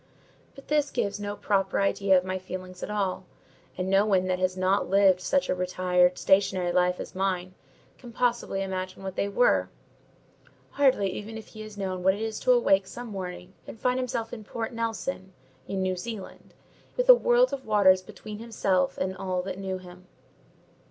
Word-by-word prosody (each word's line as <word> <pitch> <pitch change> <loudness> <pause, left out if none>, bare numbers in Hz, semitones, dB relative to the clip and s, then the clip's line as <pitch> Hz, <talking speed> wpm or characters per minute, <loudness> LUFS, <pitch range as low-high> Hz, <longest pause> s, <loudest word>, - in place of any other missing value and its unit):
But 275 - -14
this 295 -1 +2
gives 200 0 -2
no 205 0 -4
proper 195 -2 0
idea 195 -1 +3
of 180 - 0
my 185 0 -2
feelings 185 0 -8
at - - -5
all; 200 -3 -1 0.5
and 185 0 -2
no 195 +1 +4
one 190 -3 +2
that 185 0 -1
has 185 0 0
not 185 +2 +1
lived 195 -1 +4
such 275 +8 +1
a - - +1
retired, 180 0 +2
stationary 190 -2 +2
life 180 0 +2
as - - -7
mine, 185 -1 -2 0.5
can 245 -2 -11
possibly 235 -5 0
imagine 185 0 -5
what 190 -1 -5
they 200 - -1
were: 245 +5 +3 1.0
hardly 265 -8 +3
even 215 +4 -7
if 220 - -11
he 215 - -10
has 215 -1 -10
known 190 -2 -3
what 190 +1 +3
it 210 - -7
is 220 -1 -3
to 255 - +2
awake 195 -6 +4
some 240 +2 -8
morning, 185 -2 -7
and 225 - -9
find 250 +2 +1
himself 235 -3 -3
in 220 -3 -7
Port 225 +2 -5
Nelson, 230 -3 -4 0.3
in 190 -1 -2
New 185 0 0
Zealand, 200 +1 -8 0.4
with - - +1
a - - +12
world - - +3
of 265 -3 -5
waters 195 -3 +5
between 210 +2 -10
himself 195 -5 0
and 190 0 -2
all 185 -1 -2
that 190 0 -5
knew 190 -1 -3
him. 180 0 -14
195 Hz, 185 wpm, -27 LUFS, 185-220 Hz, 1.0 s, a